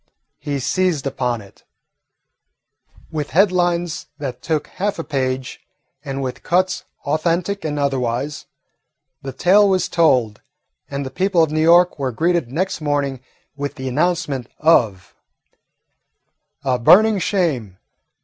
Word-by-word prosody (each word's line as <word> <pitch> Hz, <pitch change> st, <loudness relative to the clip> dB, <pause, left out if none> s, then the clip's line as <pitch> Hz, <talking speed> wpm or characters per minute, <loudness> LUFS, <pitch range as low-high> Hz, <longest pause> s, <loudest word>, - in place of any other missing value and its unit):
He 145 Hz, -1 st, -3 dB
seized 175 Hz, +1 st, 0 dB
upon 125 Hz, -4 st, -2 dB
it. 100 Hz, -, -18 dB, 1.5 s
With 150 Hz, -2 st, -3 dB
headlines 175 Hz, -3 st, +1 dB
that 130 Hz, -4 st, -6 dB
took 155 Hz, 0 st, -1 dB
half 200 Hz, +2 st, -3 dB
a 165 Hz, -, -3 dB
page, 130 Hz, -3 st, -3 dB, 0.4 s
and 135 Hz, -2 st, -4 dB
with 130 Hz, -1 st, -5 dB
cuts 185 Hz, +1 st, 0 dB, 0.2 s
authentic 170 Hz, +6 st, -1 dB
and 150 Hz, -1 st, -2 dB
otherwise, 135 Hz, 0 st, -2 dB, 0.7 s
the 135 Hz, -, -6 dB
tale 195 Hz, +8 st, +4 dB
was 185 Hz, -1 st, +1 dB
told, 130 Hz, -, +2 dB, 0.5 s
and 140 Hz, 0 st, -4 dB
the 130 Hz, -, -6 dB
people 185 Hz, +3 st, +2 dB
of 155 Hz, -, -1 dB
New 155 Hz, 0 st, 0 dB
York 175 Hz, +1 st, +5 dB
were 135 Hz, -2 st, -1 dB
greeted 165 Hz, 0 st, 0 dB
next 180 Hz, +3 st, -2 dB
morning 145 Hz, -3 st, -1 dB, 0.4 s
with 145 Hz, 0 st, -4 dB
the 130 Hz, 0 st, -6 dB
announcement 150 Hz, -3 st, -1 dB
of 115 Hz, -, +2 dB, 1.5 s
"A 130 Hz, -2 st, 0 dB
Burning 210 Hz, -, +6 dB
Shame! 145 Hz, -, -1 dB
150 Hz, 125 wpm, -20 LUFS, 130-175 Hz, 1.5 s, Burning